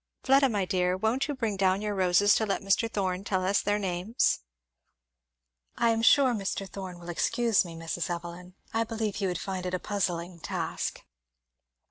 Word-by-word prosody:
Fleda, 270 0 +5
my 205 -4 0
dear, 180 -1 +1
won't 225 +8 0
you 290 - -3
bring 225 -5 -1
down 190 0 +2
your 210 0 -2
roses 190 +2 +4
to 220 - +2
let 200 - -1
Mr. 195 +3 +1
Thorn 190 -2 -1
tell 190 -2 -1
us 195 +2 +2
their 205 +1 +1
names?" 190 +3 0 1.4
"I 235 -1 +3
am 225 0 0
sure 260 +2 +5
Mr. 195 -2 -3
Thorn 190 -2 -7
will 175 0 -10
excuse 230 +5 +2
me, 170 -2 -9
Mrs. 165 +2 -3
Evelyn 175 +1 -6 0.2
I 225 0 +2
believe 220 -2 -3
he 200 -2 0
would 180 -2 -1
find 185 0 -4
it 180 0 -2
a - - -2
puzzling 175 -3 -2
task." - - -3
195 Hz, 180 wpm, -28 LUFS, 180-220 Hz, 1.4 s, Fleda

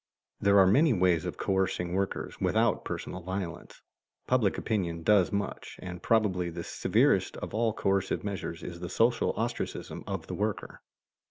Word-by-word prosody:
There 100 0 +4
are 95 - +8
many 135 - +5
ways 90 -4 +2
of - - -4
coercing 95 -2 0
workers 95 +1 -2
without - - +2
personal 95 - -5
violence. 90 -1 -6 0.4
Public 120 -6 +2
opinion 85 -7 -2
does 100 -1 +4
much, 100 0 -4
and 90 -1 -7
probably 95 -6 +2
the 85 0 -6
severest - - +2
of - - -6
all 115 0 +2
coercive 95 -2 0
measures 95 -4 -4
is 85 -1 -7
the 90 0 -5
social 115 +4 +2
ostracism 120 +1 -3
of - - -4
the - - -6
worker. 105 0 -3
95 Hz, 155 wpm, -29 LUFS, 90-105 Hz, 0.4 s, are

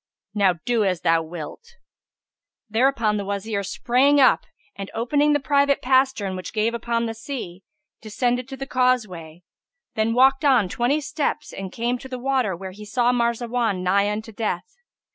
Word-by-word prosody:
Now 200 -3 +3
do 235 -3 +2
as 185 -4 0
thou 165 0 +3
wilt." 175 - -9 0.9
Thereupon 225 -1 +1
the 200 - -3
Wazir 200 +1 -3
sprang 255 +8 +2
up 260 - +4 0.3
and, 195 -1 -7
opening 290 +6 +2
the 290 - +2
private 280 0 +2
pastern 260 -7 +1
which 185 - -7
gave 220 +2 0
upon 235 0 -1
the 225 - -3
sea, 225 -6 -7 0.4
descended 245 +3 -1
to 270 0 -8
the 270 - -5
causeway; 210 -11 -1 0.5
then 220 +1 0
walked 265 +3 +4
on 255 -9 +4
twenty 250 +9 0
steps 300 +1 -3
and 190 -1 -6
came 240 +3 -2
to 265 - -9
the 255 - -5
water 250 -6 0
where 190 +2 -8
he 210 +3 -11
saw 240 +4 +1
Marzawan 235 -4 0
nigh 200 +3 +2
unto 215 +2 -4
death. 225 - -4
235 Hz, 160 wpm, -23 LUFS, 200-260 Hz, 0.9 s, up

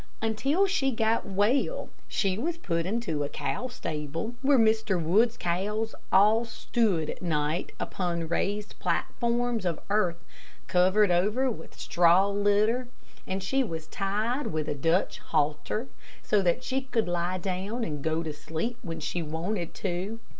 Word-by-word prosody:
Until 270 - +2
she 285 -9 +1
got 225 -2 +1
well, 215 - +1 0.2
she 195 -2 0
was 325 - -2
put 170 - -1
into 210 -7 -1
the 145 -1 -1
cow 255 - -3
stable, 165 - -4
where 275 0 +5
Mr. 220 -4 +3
Wood's 215 +9 +3
cows 210 +6 -1 0.2
all 215 +4 +5
stood 220 -7 0
at - - -10
night 155 -1 -1
upon 170 -3 -2
raised 205 +5 -2
platforms 240 -1 0
of 170 -4 -1
earth 180 -5 +1 0.4
covered 185 +2 +4
over 210 +9 +2
with 160 - -9
straw 170 +11 +4
litter, 205 +5 +2 0.4
and 190 0 -2
she 270 +8 +2
was 165 -8 -5
tied 215 - -1
with 155 -1 -2
a - - 0
Dutch 165 +6 +1
halter, 150 - -1 0.4
so 210 - +3
that 185 +7 +1
she 265 +1 -1
could 240 -5 -1
lie 175 +1 0
down 195 +6 -3
and 150 -7 -4
go 160 +1 0
to 155 -2 -4
sleep 165 +11 -4
when 165 -4 -5
she 175 - -2
wanted 170 +3 -3
to. 195 +4 -3
200 Hz, 150 wpm, -28 LUFS, 170-230 Hz, 0.4 s, where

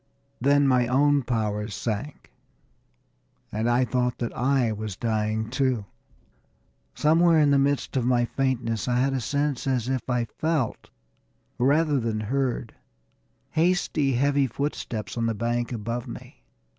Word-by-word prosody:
Then 140 +2 +4
my 125 -2 +3
own 145 +3 +3
powers 105 -4 -2
sank, 120 +6 -5 1.2
and 110 +3 -1
I 125 +2 +3
thought 125 0 0
that 120 - -4
I 130 -2 +2
was 105 -2 -5
dying, 110 0 -1
too. 130 -5 0 1.1
Somewhere 165 +2 +4
in 145 -2 +4
the 140 - +4
midst 140 0 0
of 130 - +1
my 120 0 +2
faintness 120 -5 -1
I 125 -1 +1
had 135 +2 +2
a 130 - -1
sense 140 +1 -1
as 125 -2 0
if 130 -2 0
I 125 -2 +1
felt, 155 +1 -2 0.7
rather 145 +3 +3
than 115 -2 -2
heard, 125 0 -2 0.8
hasty, 160 -4 +1
heavy 140 +2 +2
footsteps 115 -5 -4
on 115 - +1
the 115 - -1
bank 120 +2 -1
above 115 +1 -4
me. - - -10
125 Hz, 140 wpm, -25 LUFS, 115-140 Hz, 1.2 s, Then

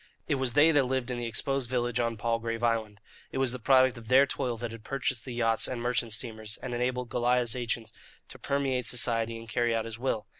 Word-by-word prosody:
It - - +1
was 125 -3 +2
they 150 +3 +6
that 145 -4 +3
lived 130 -1 -1
in 120 - -3
the 120 - -3
exposed 130 +3 0
village 120 -1 0
on 115 -1 0
Palgrave 115 0 -2
Island. 110 -3 0 0.3
It - - -4
was 135 -2 +2
the 125 - -4
product 130 0 +4
of 115 - -13
their 130 +3 +6
toil 125 -3 -2
that 120 0 -5
had 115 -1 -10
purchased 125 -2 -2
the 130 - -6
yachts 115 -2 +2
and 125 - -4
merchant 120 -1 -1
steamers 110 -1 -2
and 125 - -4
enabled 125 0 -1
Goliah's 120 -1 +2
agents 120 -2 -3 0.4
to - - -11
permeate 135 -3 -1
society 115 -1 0
and 115 0 -10
carry 120 0 +1
out 115 0 -1
his 115 0 -7
will. 120 -4 -1
120 Hz, 225 wpm, -29 LUFS, 115-130 Hz, 0.4 s, they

